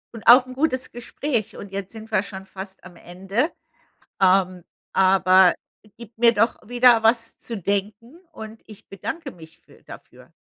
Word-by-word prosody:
Und 225 Hz, -, -11 dB
auch 250 Hz, +2 st, +8 dB
'n 255 Hz, -, -10 dB
gutes 260 Hz, -2 st, -2 dB
Gespräch 240 Hz, -2 st, -4 dB
und 200 Hz, -1 st, -10 dB
jetzt 195 Hz, -1 st, -6 dB
sind 220 Hz, 0 st, -12 dB
wir 195 Hz, -, +2 dB
schon 190 Hz, -1 st, -9 dB
fast 190 Hz, 0 st, -11 dB
am 180 Hz, -2 st, -14 dB
Ende. 195 Hz, -, -3 dB, 0.7 s
Ähm, 185 Hz, -1 st, +2 dB, 0.3 s
aber 185 Hz, -1 st, +4 dB, 0.4 s
gibt 230 Hz, -1 st, -14 dB
mir 235 Hz, 0 st, +4 dB
doch 225 Hz, +2 st, +1 dB
wieder 245 Hz, -1 st, +4 dB
was 230 Hz, 0 st, +1 dB
zu 230 Hz, -3 st, -7 dB
denken 205 Hz, -, -4 dB
und 220 Hz, -4 st, -11 dB
ich 215 Hz, -2 st, -16 dB
bedanke 270 Hz, -, -6 dB
mich 160 Hz, -1 st, -16 dB
für -, -, -23 dB
dafür. -, -, -15 dB
215 Hz, 160 wpm, -22 LUFS, 190-235 Hz, 0.7 s, auch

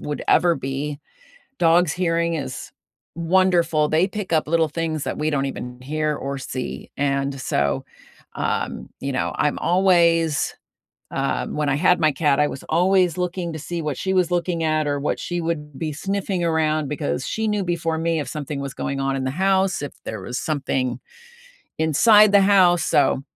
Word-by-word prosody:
would 150 Hz, 0 st, -4 dB
ever 175 Hz, -1 st, +4 dB
be, 140 Hz, +2 st, -4 dB, 0.6 s
dog's 170 Hz, -1 st, +4 dB
hearing 170 Hz, -2 st, 0 dB
is 130 Hz, -5 st, -5 dB, 0.4 s
wonderful. 170 Hz, -2 st, +2 dB
They 160 Hz, +5 st, +3 dB
pick 205 Hz, -3 st, -5 dB
up 155 Hz, -2 st, +2 dB
little 165 Hz, -1 st, +2 dB
things 155 Hz, -1 st, -3 dB
that -, -, -4 dB
we 155 Hz, +1 st, 0 dB
don't 140 Hz, -2 st, 0 dB
even 125 Hz, -2 st, -6 dB
hear 155 Hz, +2 st, -1 dB
or 140 Hz, 0 st, -4 dB
see, 130 Hz, -1 st, -6 dB
and 140 Hz, -1 st, -1 dB
so, 70 Hz, -, 0 dB, 0.5 s
um, -, -, -2 dB
you 140 Hz, 0 st, -3 dB
know, 130 Hz, -, -1 dB
I'm 150 Hz, -, 0 dB
always 170 Hz, -4 st, +3 dB, 0.6 s
um, 135 Hz, 0 st, -2 dB
when 150 Hz, -1 st, -1 dB
I 135 Hz, -, +2 dB
had 180 Hz, +3 st, +3 dB
my 155 Hz, -2 st, +4 dB
cat, 145 Hz, 0 st, +1 dB
I 150 Hz, -, +3 dB
was 135 Hz, -, -8 dB
always 180 Hz, +1 st, +2 dB
looking 180 Hz, -1 st, -3 dB
to 155 Hz, -, -6 dB
see 170 Hz, +2 st, -4 dB
what 150 Hz, -4 st, -3 dB
she 190 Hz, -, -2 dB
was 180 Hz, -2 st, +2 dB
looking 175 Hz, -1 st, 0 dB
at 155 Hz, -1 st, +1 dB
or 145 Hz, 0 st, 0 dB
what 140 Hz, -, -2 dB
she 175 Hz, 0 st, -3 dB
would 150 Hz, -4 st, -4 dB
be 155 Hz, -2 st, -3 dB
sniffing 195 Hz, +2 st, -2 dB
around 155 Hz, -2 st, +1 dB
because 75 Hz, -, -2 dB
she 220 Hz, 0 st, -2 dB
knew 210 Hz, -2 st, 0 dB
before 165 Hz, -2 st, -1 dB
me 165 Hz, 0 st, 0 dB
if 145 Hz, -, -4 dB
something 150 Hz, -1 st, -5 dB
was 140 Hz, -1 st, -5 dB
going 140 Hz, 0 st, -3 dB
on 135 Hz, 0 st, 0 dB
in 135 Hz, -, -2 dB
the 130 Hz, -, -1 dB
house, 190 Hz, +2 st, +1 dB
if 145 Hz, -, -5 dB
there 110 Hz, -, -5 dB
was 125 Hz, +7 st, -5 dB
something 135 Hz, -4 st, -1 dB, 0.8 s
inside 205 Hz, +7 st, +5 dB
the 200 Hz, -, +7 dB
house, 185 Hz, -4 st, +5 dB
so, 135 Hz, -1 st, +2 dB
160 Hz, 180 wpm, -22 LUFS, 140-175 Hz, 0.8 s, the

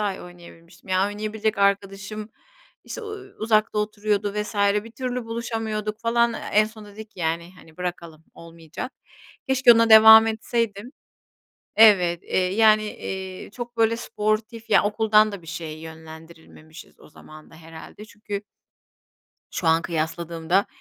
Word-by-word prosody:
ay 205 Hz, -2 st, -2 dB
oynayabilmiştim. 175 Hz, 0 st, -15 dB
Ya, 185 Hz, +1 st, +2 dB
oynayabilecek 215 Hz, +1 st, -3 dB
arkadaşım, 200 Hz, +1 st, -1 dB, 0.6 s
işte, -, -, -7 dB
uuu, 415 Hz, -2 st, -9 dB
uzakta 215 Hz, -1 st, +1 dB
oturuyordu 210 Hz, -1 st, -1 dB
vs. 210 Hz, +1 st, -4 dB, 0.3 s
bir 230 Hz, -, -11 dB
türlü 250 Hz, -1 st, -4 dB
buluşamıyorduk 225 Hz, -2 st, -4 dB
falan. 235 Hz, 0 st, +2 dB, 0.2 s
En 215 Hz, +1 st, +5 dB
sonunda 215 Hz, -1 st, -11 dB
dedik 215 Hz, +1 st, -11 dB
ki, 185 Hz, -, -13 dB
yani, 170 Hz, +2 st, -2 dB
hani, 160 Hz, -3 st, -18 dB
bırakalım, 170 Hz, -3 st, -6 dB
olmayacak. 165 Hz, -, -9 dB, 0.6 s
Keşke 265 Hz, -2 st, +6 dB
ona 230 Hz, 0 st, +3 dB
devam 220 Hz, 0 st, +9 dB
etseydim. 225 Hz, 0 st, -3 dB, 0.8 s
Evet, 185 Hz, -6 st, +5 dB
eee, -, -, -2 dB, 0.2 s
yani, 215 Hz, 0 st, +5 dB
eee, 190 Hz, -3 st, -7 dB
çok 240 Hz, +1 st, -8 dB
böyle 225 Hz, 0 st, +2 dB
sportif 220 Hz, +1 st, -3 dB
ya, -, -, +5 dB
okuldan 215 Hz, 0 st, +3 dB
da 200 Hz, -3 st, -8 dB
bir -, -, -17 dB
şeye 160 Hz, -1 st, -7 dB
yönlendirilmemişiz 160 Hz, 0 st, -13 dB
o -, -, -16 dB
zaman 155 Hz, 0 st, -15 dB
da -, -, -17 dB
herhâlde. 165 Hz, +5 st, -12 dB
Çünkü 210 Hz, -1 st, -7 dB, 1.1 s
şu 175 Hz, -, -4 dB
an 165 Hz, +1 st, +3 dB
kıyasladığımda, 170 Hz, +2 st, -1 dB
210 Hz, 135 wpm, -23 LUFS, 170-220 Hz, 1.1 s, devam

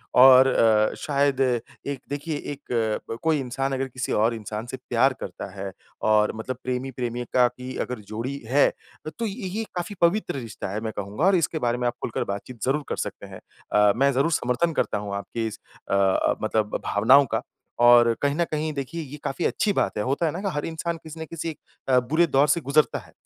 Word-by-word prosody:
और 130 Hz, +1 st, +9 dB
अ, 110 Hz, -4 st, +3 dB
शायद, 140 Hz, -2 st, +1 dB, 0.4 s
एक 140 Hz, -1 st, -3 dB
देखिए 145 Hz, +2 st, -3 dB, 0.2 s
एक 115 Hz, -6 st, -2 dB, 0.2 s
कोई 160 Hz, -2 st, +2 dB
इंसान 135 Hz, +1 st, -2 dB
अगर 135 Hz, 0 st, -1 dB
किसी 130 Hz, 0 st, -4 dB
और 110 Hz, +3 st, +2 dB
इंसान 110 Hz, 0 st, -5 dB
से 130 Hz, -, -5 dB
प्यार 130 Hz, +3 st, +3 dB
करता 95 Hz, +1 st, -7 dB
है, 95 Hz, 0 st, -5 dB, 0.3 s
और 105 Hz, 0 st, +3 dB
मतलब 120 Hz, +3 st, -5 dB
प्रेमी-प्रेमिका 125 Hz, -1 st, 0 dB
की 125 Hz, +1 st, -8 dB
अगर 125 Hz, -2 st, -5 dB
जोड़ी 120 Hz, +6 st, -4 dB
है, 140 Hz, +3 st, +5 dB, 0.5 s
तो 230 Hz, -, 0 dB
ये 205 Hz, -1 st, -4 dB
ये 210 Hz, +5 st, -3 dB
काफ़ी 180 Hz, +3 st, -4 dB
पवित्र 170 Hz, +3 st, +2 dB
रिश्ता 115 Hz, -5 st, -6 dB
है 105 Hz, -, -2 dB
मैं 110 Hz, -1 st, -4 dB
कहूँगा, 100 Hz, -, -2 dB
और 195 Hz, 0 st, +5 dB
इसके 165 Hz, -2 st, 0 dB
बारे 120 Hz, -, +1 dB
में 125 Hz, 0 st, 0 dB
आप 120 Hz, -, 0 dB
खुलकर 115 Hz, -, -2 dB
बातचीत 110 Hz, +3 st, -8 dB
ज़रूर 145 Hz, +3 st, +1 dB
कर -, -, -2 dB
सकते -, -, -8 dB
हैं। -, -, -10 dB, 0.3 s
अ, 105 Hz, -1 st, +5 dB
मैं 140 Hz, +3 st, +3 dB
जरूर 140 Hz, +6 st, +2 dB
समर्थन 155 Hz, +5 st, +1 dB
करता -, -, -2 dB
हूँ 100 Hz, -1 st, -4 dB
आपकी 110 Hz, +3 st, -3 dB
इस 110 Hz, -, -7 dB, 0.3 s
अ, -, -, 0 dB
अ, 100 Hz, -1 st, +3 dB
मतलब 105 Hz, -1 st, 0 dB
भावनाओं 130 Hz, +8 st, +5 dB
का। 110 Hz, -, 0 dB, 0.4 s
और 120 Hz, -1 st, +7 dB
कहीं 145 Hz, 0 st, +1 dB
ना 170 Hz, -, +2 dB
कहीं 155 Hz, 0 st, -2 dB
देखिए 145 Hz, +4 st, -4 dB
ये 150 Hz, 0 st, -8 dB
काफ़ी 150 Hz, +6 st, -2 dB
अच्छी 210 Hz, -, +1 dB
बात -, -, 0 dB
है। 105 Hz, -, 0 dB
होता 140 Hz, +7 st, 0 dB
है 155 Hz, -, +1 dB
ना, 175 Hz, -, -5 dB
कि 200 Hz, -, -2 dB
हर 145 Hz, -, -2 dB
इंसान 165 Hz, +1 st, -3 dB
किसी 160 Hz, 0 st, -10 dB
ना 160 Hz, -, -4 dB
किसी 165 Hz, 0 st, -5 dB, 0.3 s
अ, 130 Hz, -1 st, +6 dB
बुरे 160 Hz, +8 st, +2 dB
दौर 140 Hz, 0 st, +3 dB
से 160 Hz, +4 st, +2 dB
गुज़रता 145 Hz, +2 st, +2 dB
है, -, -, -16 dB
130 Hz, 210 wpm, -25 LUFS, 115-150 Hz, 0.5 s, और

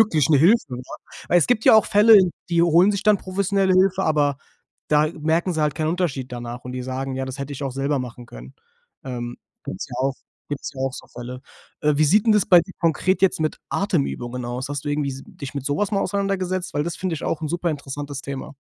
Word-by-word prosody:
wirklich 160 Hz, -10 st, +3 dB
'ne 145 Hz, -, +6 dB
Hilfe, 165 Hz, -, +3 dB
ja. 125 Hz, +1 st, -9 dB, 0.3 s
Weil 175 Hz, -, +4 dB
es 170 Hz, -, +2 dB
gibt 235 Hz, -3 st, +1 dB
ja -, -, +9 dB
auch 220 Hz, -, +6 dB
Fälle, 210 Hz, +1 st, +7 dB, 0.3 s
die 170 Hz, -1 st, +3 dB
holen 175 Hz, +4 st, +5 dB
sich 200 Hz, -1 st, -2 dB
dann 210 Hz, -1 st, +4 dB
professionelle 190 Hz, 0 st, 0 dB
Hilfe, 190 Hz, 0 st, +3 dB
aber 145 Hz, -3 st, +1 dB, 0.5 s
da 150 Hz, 0 st, +3 dB
merken 165 Hz, +4 st, 0 dB
sie 160 Hz, -, -2 dB
halt 150 Hz, -2 st, +1 dB
keinen 155 Hz, -1 st, -1 dB
Unterschied 155 Hz, -7 st, -2 dB
danach 120 Hz, 0 st, -6 dB
und 125 Hz, -, -6 dB
die 125 Hz, -, -4 dB
sagen. 130 Hz, +1 st, -4 dB
„Ja, 130 Hz, 0 st, -3 dB
das 130 Hz, +1 st, -7 dB
hätte 140 Hz, +1 st, -5 dB
ich 140 Hz, +1 st, -7 dB
auch 135 Hz, -, -2 dB
selber 140 Hz, +1 st, -1 dB
machen 125 Hz, -1 st, -7 dB
können." -, -, -12 dB, 0.5 s
Ähm, 120 Hz, -2 st, -5 dB, 0.3 s
gibt's 95 Hz, -, -5 dB
ja -, -, -6 dB
auch 135 Hz, +1 st, 0 dB, 0.3 s
gibt's 145 Hz, +1 st, -5 dB
ja 130 Hz, -, -8 dB
auch 135 Hz, -1 st, -1 dB
so -, -, -10 dB
Fälle. 125 Hz, +1 st, -8 dB, 0.4 s
Äh, 150 Hz, 0 st, +3 dB
wie 155 Hz, -, +5 dB
sieht 200 Hz, +9 st, +4 dB
'n 220 Hz, -, +6 dB
das 210 Hz, -2 st, +3 dB
bei 175 Hz, -2 st, +7 dB
dir 190 Hz, +2 st, -9 dB
konkret 175 Hz, +3 st, +1 dB
jetzt 190 Hz, -2 st, +2 dB
mit 155 Hz, -1 st, -1 dB
Atemübungen 125 Hz, -10 st, -2 dB
aus? 125 Hz, +2 st, -4 dB
Hast 145 Hz, +1 st, -5 dB
du -, -, -1 dB
irgendwie 145 Hz, -1 st, -1 dB
s 135 Hz, +1 st, -8 dB
dich 140 Hz, -, -9 dB
mit 140 Hz, -2 st, -5 dB
so 145 Hz, -, 0 dB
was 205 Hz, +3 st, 0 dB
mal 200 Hz, -2 st, +1 dB
auseinandergesetzt? 185 Hz, -2 st, -2 dB
Weil 145 Hz, -, 0 dB
das 170 Hz, +2 st, -4 dB
find 185 Hz, -2 st, -3 dB
ich 160 Hz, -, -4 dB
auch 165 Hz, -, -2 dB
'n 155 Hz, -, -2 dB
superinteressantes 145 Hz, -4 st, -4 dB
Thema. 140 Hz, 0 st, -6 dB
150 Hz, 240 wpm, -22 LUFS, 135-185 Hz, 0.5 s, ja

